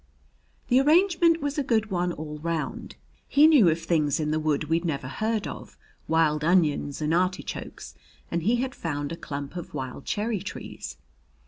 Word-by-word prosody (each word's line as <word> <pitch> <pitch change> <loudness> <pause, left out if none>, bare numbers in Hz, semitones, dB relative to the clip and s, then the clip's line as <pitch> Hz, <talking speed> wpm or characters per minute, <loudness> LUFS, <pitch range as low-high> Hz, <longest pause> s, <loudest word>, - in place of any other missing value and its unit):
The 250 +1 +5
arrangement 335 +2 +4
was 285 +1 -2
a - - +1
good 220 -4 0
one 180 -1 0
all 150 -2 -7
round. 165 0 -4 0.3
He 290 +2 +5
knew 285 - +7
of 160 +1 0
things 160 -4 +1
in 150 -1 -1
the 155 - +1
wood 155 -1 0
we'd 165 +3 0
never 140 -6 -2
heard 215 - -1
of - - -9 0.3
wild 155 -2 +2
onions 155 -4 +2
and 150 +2 +1
artichokes, 185 +2 -2 0.4
and 170 - 0
he 220 +8 +2
had 255 +1 -2
found 145 -3 -4
a - - -3
clump 140 -1 -6
of 175 - -7
wild 130 +1 -5
cherry 215 0 -1
trees. 200 - -7
170 Hz, 175 wpm, -26 LUFS, 150-225 Hz, 0.4 s, knew